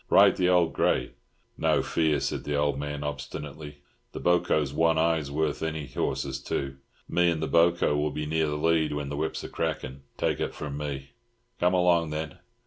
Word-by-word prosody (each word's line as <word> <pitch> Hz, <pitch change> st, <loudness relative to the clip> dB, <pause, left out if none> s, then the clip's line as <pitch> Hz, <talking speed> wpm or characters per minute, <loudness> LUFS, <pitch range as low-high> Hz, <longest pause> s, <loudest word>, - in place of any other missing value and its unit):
Ride -, -, +6 dB
the 90 Hz, -1 st, +3 dB
old 90 Hz, -2 st, +3 dB
grey." -, -, +1 dB, 0.5 s
"No -, -, +2 dB
fear," 80 Hz, -2 st, +1 dB
said -, -, -2 dB
the 75 Hz, -, -2 dB
old 70 Hz, -1 st, +1 dB
man 75 Hz, 0 st, -4 dB
obstinately, 75 Hz, +1 st, -6 dB, 0.3 s
"the -, -, -5 dB
boco's 85 Hz, -5 st, +2 dB
one 80 Hz, +1 st, +3 dB
eye's 80 Hz, -3 st, +1 dB
worth 75 Hz, +1 st, -1 dB
any 80 Hz, -2 st, -2 dB
horse's 65 Hz, +1 st, -2 dB
two. 70 Hz, 0 st, -3 dB, 0.3 s
Me 85 Hz, 0 st, +3 dB
an' 85 Hz, -2 st, 0 dB
the 80 Hz, -, -1 dB
boco 85 Hz, -2 st, +3 dB
will 75 Hz, +1 st, +1 dB
be 75 Hz, +1 st, -4 dB
near 80 Hz, +1 st, +1 dB
the 75 Hz, 0 st, -2 dB
lead 80 Hz, 0 st, +2 dB
when 75 Hz, -1 st, -3 dB
the 75 Hz, -, -3 dB
whips 80 Hz, +1 st, -2 dB
are -, -, -5 dB
crackin', 65 Hz, +1 st, -3 dB, 0.2 s
take -, -, 0 dB
it -, -, -2 dB
from 75 Hz, -2 st, -5 dB
me." 70 Hz, -2 st, -5 dB, 0.5 s
"Come 90 Hz, +1 st, +3 dB
along, 85 Hz, -3 st, +3 dB
then!" 75 Hz, -1 st, -5 dB
75 Hz, 190 wpm, -27 LUFS, 70-80 Hz, 0.5 s, Ride